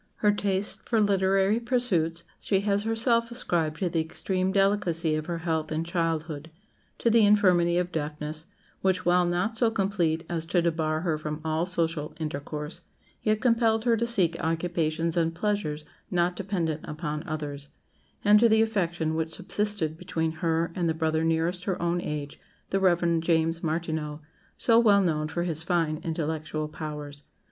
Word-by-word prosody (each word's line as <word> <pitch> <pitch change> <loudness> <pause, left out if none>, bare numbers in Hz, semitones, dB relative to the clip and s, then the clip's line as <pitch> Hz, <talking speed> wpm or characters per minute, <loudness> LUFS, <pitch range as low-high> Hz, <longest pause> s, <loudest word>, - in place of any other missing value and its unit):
Her 210 - +3
tastes 200 -1 0
for 230 - +1
literary 195 +1 +3
pursuits 205 -10 0 0.2
she 195 -2 +1
has 200 0 +1
herself 230 +1 +1
ascribed 170 -10 -1
to 185 - +2
the 165 -1 0
extreme 185 +3 -1
delicacy 190 -5 +2
of 155 0 -2
her 170 -1 -2
health 160 -2 -1
in 155 +1 -1
childhood; 165 -2 -2 0.5
to 235 - +2
the 230 -1 +5
infirmity 180 -5 +4
of 180 0 0
deafness, 155 0 -4 0.3
which, 185 -1 +1
while 175 0 +4
not 180 +6 -1
so 230 0 +4
complete 185 -6 0
as 165 -1 -3
to 175 +1 +2
debar 160 -2 0
her 160 -3 -1
from 150 0 -4
all 160 +2 0
social 165 -4 -1
intercourse, 150 +1 -4 0.4
yet 215 0 +1
compelled 230 -3 +3
her 235 -1 +3
to 235 +1 -1
seek 190 -8 +2
occupations 165 0 -1
and 165 -1 +1
pleasures 170 -6 -2 0.2
not 175 0 +1
dependent 175 -6 -2
upon 150 0 -4
others; 145 -3 -5 0.6
and 210 +1 +7
to 235 +1 +5
the 220 0 +5
affection 175 -7 -1
which 160 0 -2
subsisted 205 -7 -1
between 160 -1 -2
her 165 +1 -1
and 170 -2 0
the 160 - 0
brother 160 0 0
nearest 165 +3 0
her 185 -3 -1
own 175 +1 0
age, 145 -3 -5 0.3
the 195 - +2
Rev. 175 -3 +3
James 165 0 +1
Martineau, 160 -2 -2 0.4
so 230 -1 +4
well 205 -4 +5
known 155 -3 0
for 170 +2 -2
his 165 -3 0
fine 165 -2 0
intellectual 155 -2 -3
powers. 150 -2 -6
170 Hz, 165 wpm, -27 LUFS, 160-195 Hz, 0.6 s, and